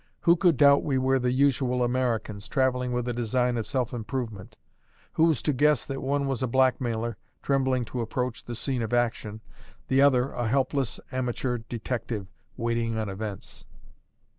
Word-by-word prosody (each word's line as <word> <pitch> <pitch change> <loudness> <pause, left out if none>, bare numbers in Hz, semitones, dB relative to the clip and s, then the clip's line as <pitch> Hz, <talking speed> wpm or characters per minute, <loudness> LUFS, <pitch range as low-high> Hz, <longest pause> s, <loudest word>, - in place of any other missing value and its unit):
Who 170 0 +5
could 175 -5 +3
doubt 140 0 +6
we 135 -3 0
were 130 +1 +2
the 125 0 +1
usual 130 -2 +2
Americans, 120 -4 -1
travelling 125 -2 +1
with 125 0 -1
a 120 - -1
design 120 +1 0
of 115 -2 -3
self 130 -4 -1
improvement? 110 -2 -5 0.6
Who 160 - +4
was 160 -7 +1
to 150 - +1
guess 145 -1 +3
that 135 -1 -5
one 140 +1 0
was 135 -3 -2
a 130 - +1
blackmailer, 120 -2 +1 0.3
trembling 130 -3 +1
to 120 +1 -4
approach 125 +1 -3
the 120 - -6
scene 125 +1 -2
of 115 +1 -3
action 115 -3 -1 0.5
the 135 +1 +4
other 135 -2 +4
a 120 -2 -2
helpless, 135 +1 0
amateur 125 -1 -2
detective, 115 -2 -4 0.3
waiting 115 -1 -1
on 110 -2 -2
events? 100 0 -6
125 Hz, 165 wpm, -27 LUFS, 115-135 Hz, 0.6 s, doubt